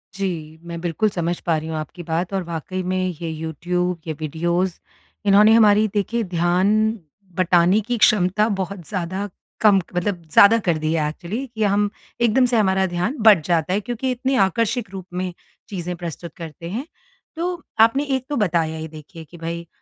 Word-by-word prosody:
जी। 165 -5 -4
मैं 170 0 -6
बिल्कुल 175 +5 0
समझ 175 -2 -2
पा 165 -2 +2
रही 155 +1 -5
हूँ 160 - -3
आपकी 155 +3 -7
बात 170 +3 -2
और 190 -1 0
वाक़ई 170 +2 -4
में 185 0 0
ये 165 - -3
यूट्यूब, 170 +3 -2
ये 160 - -1
वीडियोज़ 170 +4 -1 0.5
इन्होंने 210 +2 +6
हमारी 215 -1 +5
देखिए 225 +3 0
ध्यान 175 +1 +1 0.7
बटाने 180 +2 +4
की 245 -1 0
क्षमता 210 -1 +3
बहुत 190 -2 -5
ज़्यादा 190 +2 -3 0.3
कम 210 -2 +6 0.2
मतलब 180 0 -1
ज़्यादा 205 +3 +8
कर 170 -3 +2
दी 155 +1 -1
है 155 -2 +1
एक्चुअली 190 - -5
कि 220 - 0
हम 205 0 +2 0.3
एकदम 235 +2 +4
से 245 -1 +1
हमारा 190 -2 +3
ध्यान 180 +9 -2
बट 210 -7 +7
जाता 170 0 +1
है 200 - +2
क्योंकि 245 +4 -2
इतनी 260 +2 -1
आकर्षक 225 +3 -1
रूप 190 -2 -7
में 180 0 -3 0.4
चीज़ें 180 -3 -4
प्रस्तुत 170 -1 -7
करते 165 0 -8
हैं। 235 +9 -4 0.5
तो 345 +1 -3 0.2
आपने 230 +6 +5
एक 260 -1 -3
तो 295 - -1
बताया 165 - 0
ही 160 0 -5
देखिए 160 +1 -11
कि 170 +3 -14
भई 170 +1 -5
180 Hz, 180 wpm, -22 LUFS, 170-210 Hz, 0.7 s, ज़्यादा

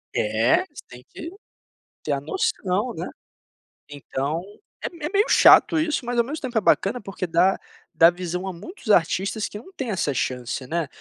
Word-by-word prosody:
É, - - +2
você 295 - -12
tem 125 0 -13
que 335 +1 -8 0.7
ter 150 - -1
a 140 - -2
noção, 235 - -1
né. - - -5 0.8
Então, 145 +2 -3 0.4
é - - -3
me 320 -3 -6
meio 410 +3 +3
chato 325 - +6
isso, 305 -5 -1
mas 245 0 -2
ao 235 - +5
mesmo 295 +6 -6
tempo 250 -4 -3
é - - +3
bacana 205 +4 +2
porque 190 -2 -5
dá 175 +3 +3 0.3
dá 165 +1 +6
visão 180 +1 -4
a 190 - -4
muitos 220 - -5
artistas 195 +5 +1
que 210 - -8
não 375 - -13
têm 265 -8 -4
essa 180 -8 -1
chance, 125 0 -3
né, 165 -1 -1
195 Hz, 180 wpm, -23 LUFS, 165-265 Hz, 0.8 s, chato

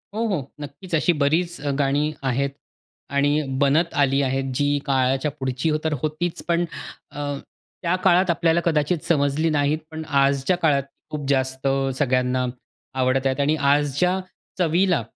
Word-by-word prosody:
हो, 225 +2 0
हो. 150 -10 -3
नक्कीच, 150 +6 -9
अशी 170 +3 +3
बरीच 170 +5 +1
अ, 145 -1 -1
गाणी 145 +2 +1
आहेत 135 +1 0 0.7
आणि 145 +2 +3 0.2
बनत 155 +5 +3
आली 135 0 +2
आहेत, 135 0 0
जी 145 +2 +2
काळाच्या 135 +1 +1
पुढची 130 +3 -1
तर 160 -1 0
होतीच, 155 +3 -2
पण 170 0 +2 0.5
अ, 145 0 -6 0.6
त्या 175 0 +1
काळात 185 0 +4
आपल्याला 170 0 +2
कदाचित 160 +1 +2
समजली 150 0 +2
नाहीत. 150 0 +1
पण 160 0 -6
आजच्या 140 +3 +2
काळात 150 -5 +2 0.3
खूप 145 -2 -5
जास्त 130 0 0
अ, 135 0 +1
सगळ्यांना 125 -1 +1 0.5
आवडत 130 +1 +1
आहेत 130 +1 -1
आणि 150 +2 +2
आजच्या 145 +6 +2 0.4
चवीला 175 -3 +2
145 Hz, 145 wpm, -23 LUFS, 135-165 Hz, 0.7 s, काळात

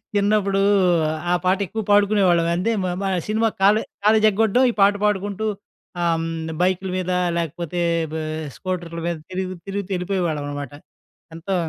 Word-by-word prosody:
చిన్నప్పుడు 200 -1 +2 0.7
ఆ - - +4
పాట 185 +1 +3
ఎక్కువ 220 +3 -4
పాడుకునేవాళ్ళం. 200 -5 +4
అంటే 190 +6 0
మేమా 185 +2 -2 0.2
సినిమా 220 +1 +1
కాలే 210 +3 +5 0.2
కాలేజీ 215 0 +5
ఎగ్గొట్టడం 225 +5 +2
ఈ - - -10
పాట 200 +1 +6
పాడుకుంటూ 205 +1 -1 0.6
ఆహ్, 170 -1 +2
హ్మ్. 165 0 -3 0.3
బైకుల 185 +1 +1
మీద 185 0 -2 0.3
లేకపోతే 170 +1 -3 0.3
బా 160 - -3 0.4
స్కూటర్ల 175 -3 -4
మీద 170 - -1 0.2
తిరుగు 185 0 -3
తిరుగుతూ 200 0 -4
ఎళ్ళిపోయేవాళ్ళం 175 -5 -1
అనమాట. 145 -2 -5 0.6
ఎంతో 185 +4 -3
190 Hz, 140 wpm, -22 LUFS, 175-205 Hz, 0.7 s, పాట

